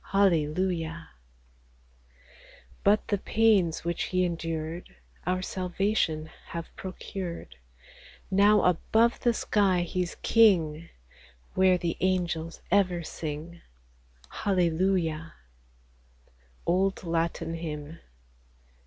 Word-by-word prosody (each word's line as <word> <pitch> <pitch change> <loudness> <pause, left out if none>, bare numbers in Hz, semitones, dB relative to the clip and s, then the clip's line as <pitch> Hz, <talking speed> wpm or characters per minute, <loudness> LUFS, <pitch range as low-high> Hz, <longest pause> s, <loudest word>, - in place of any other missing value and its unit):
Hallelujah! 170 -2 +1 1.7
But 210 +1 +3
the 205 -2 +1
pains 200 -8 +2
which 170 0 -1
He 185 0 +1
endured 165 - -4 0.3
Our 185 0 0
salvation 180 -4 -1 0.2
have 170 -1 -7
procured; 185 - -7 0.7
Now 205 +2 +5
above 220 +7 +2
the 240 - +3
sky 200 -5 +2
He's 180 0 -2
King, 170 -8 +4 0.6
Where 185 -1 +4
the 170 -2 -2
angels 175 -3 -1
ever 180 -3 +2
sing, 160 +2 -6 0.4
— - - -29
Hallelujah! 175 -3 +1 1.3
Old 190 +3 +1
Latin 165 -1 -1
Hymn. 160 -1 -6
175 Hz, 85 wpm, -28 LUFS, 165-190 Hz, 1.7 s, Now